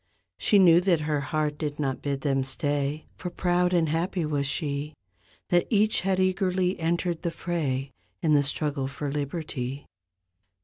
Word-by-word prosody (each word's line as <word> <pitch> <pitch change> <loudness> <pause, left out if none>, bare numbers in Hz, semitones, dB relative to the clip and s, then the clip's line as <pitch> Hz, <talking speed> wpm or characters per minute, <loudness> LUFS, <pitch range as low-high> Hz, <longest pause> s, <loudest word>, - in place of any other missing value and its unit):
She 210 - +3
knew 175 -3 +7
that 180 -4 +2
her 150 -1 0
heart 150 0 -2
did 150 -2 -3
not 135 -3 -1
bid 140 -1 -2
them 135 -2 +1
stay 145 +2 -1
For 180 - -5
proud 180 0 +1
and 170 -3 +2
happy 170 +2 -1
was 145 -2 0
she, 145 +1 0 0.5
That 175 -1 +3
each 215 -1 +3
had 190 0 0
eagerly 185 -1 +1
entered 170 +1 -1
the 175 - -1
fray 145 -6 -2 0.3
In 155 -2 +3
the 145 - +5
struggle 140 0 -1
for 140 +1 -4
liberty. 140 -2 -4
155 Hz, 160 wpm, -26 LUFS, 145-175 Hz, 0.5 s, knew